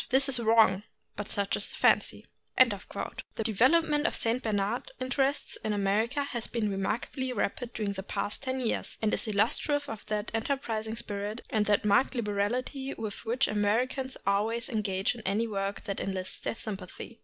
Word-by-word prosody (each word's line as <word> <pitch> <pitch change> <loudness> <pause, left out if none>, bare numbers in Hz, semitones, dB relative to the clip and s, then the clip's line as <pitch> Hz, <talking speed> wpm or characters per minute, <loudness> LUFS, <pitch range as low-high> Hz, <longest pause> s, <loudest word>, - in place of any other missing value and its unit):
This 265 +2 +3
is 260 -3 +2
wrong, 220 -4 +5 0.3
but 205 0 -4
such 200 0 0
is - - 0
the - - -5
fancy. - - +3 0.3
The 225 - 0
development 295 +8 +4
of - - 0
St. 235 +2 +1
Bernard 210 +1 -1
interests 270 +2 0
in 215 - 0
Amer 205 +2 +2
ica 285 +3 -2
has 240 -5 -3
been 220 -3 -1
remarkably 230 +7 -2
rapid 240 +2 -2
during 210 -2 -1
the 190 - -4
past 200 +1 -3
ten 260 -1 -2
years, 235 - -1
and 215 - +2
is - - +1
illustrative 280 +7 +1
of 225 -4 -6
that 210 0 -2
enterprising 225 -2 -1
spirit 210 -1 -4
and 215 -1 +2
that 210 0 +3
marked 210 +7 +4
liberality 240 +5 -1
with 215 -2 -5
which 250 +4 +2
Americans 245 +6 0
always 220 +5 +1
engage 195 -5 0
in 235 - -9
any 210 +3 +1
work 200 -1 -2
that 200 -2 -3
enlists 185 -1 -3
their - - -3
sympathy. 210 +1 -7
220 Hz, 170 wpm, -30 LUFS, 205-255 Hz, 0.3 s, wrong